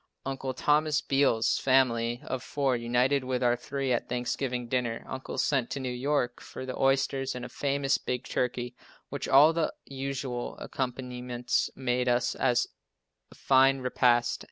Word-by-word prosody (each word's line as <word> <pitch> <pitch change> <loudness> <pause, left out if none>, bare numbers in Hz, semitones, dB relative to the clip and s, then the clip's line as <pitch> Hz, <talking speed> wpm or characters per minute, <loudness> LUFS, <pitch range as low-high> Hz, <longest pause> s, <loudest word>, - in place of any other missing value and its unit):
Uncle 135 -1 -3
Thomas 150 +2 +2
Beals' 135 -5 +2
family 120 -3 +2
of 130 - -3
four 135 -1 0
united 125 +3 +1
with 130 -1 -1
our 120 0 +4
three 135 +1 -2
at 120 - -2
Thanksgiving 125 0 -2
dinner. 120 -2 -2
Uncle 130 0 -6
sent 135 -5 +1
to - - -4
New 130 -1 -3
York 125 -1 -1
for 130 - -8
the 130 - -5
oysters, 135 0 +1
and 125 - -5
a - - -8
famous 140 -1 0
big 125 0 -3
turkey, 125 -1 -2 0.4
with - - -4
all 150 +4 +7
the 165 -1 0
usual 135 -2 -4
accompaniments, 125 -1 -2
made 125 -1 0
us 120 0 +1
a 125 -2 +2 0.8
fine 135 0 +4
repast. 125 -1 +2
130 Hz, 150 wpm, -28 LUFS, 125-135 Hz, 0.8 s, all